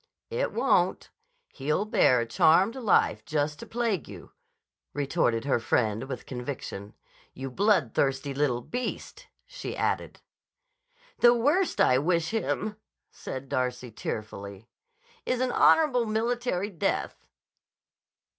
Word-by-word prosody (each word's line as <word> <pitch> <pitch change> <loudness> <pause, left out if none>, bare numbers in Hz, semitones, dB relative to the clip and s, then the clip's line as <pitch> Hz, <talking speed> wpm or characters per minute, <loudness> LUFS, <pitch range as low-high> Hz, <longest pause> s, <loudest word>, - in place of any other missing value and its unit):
"It 480 +2 -1
won't. - - +1 0.4
He'll 150 +9 -1
bear 125 - +4
a - - -2
charmed 165 - +4
life, 240 -6 +2
just 150 -1 -2
to - - -9
plague 225 - -1
you," - - -11 0.6
retorted 135 -4 0
her 135 -4 +2
friend 110 -1 0
with 130 -1 -6
conviction. 125 -6 -6 0.4
"You 135 0 -6
bloodthirsty 140 - +1
little 135 -4 0
beast!" 250 - -5 0.2
she - - -7
added. - - -2 1.0
"The 240 0 +6
worst 295 +11 +1
I 130 - +5
wish 165 +3 0
him," 215 -1 -2 0.3
said 130 +1 -7
Darcy 125 -1 -2
tearfully, 100 -1 -6 0.6
"is 250 - -1
an 255 -1 0
honorable 250 -7 +4
military 220 -2 -1
death." 170 - -2
150 Hz, 115 wpm, -27 LUFS, -, 1.0 s, The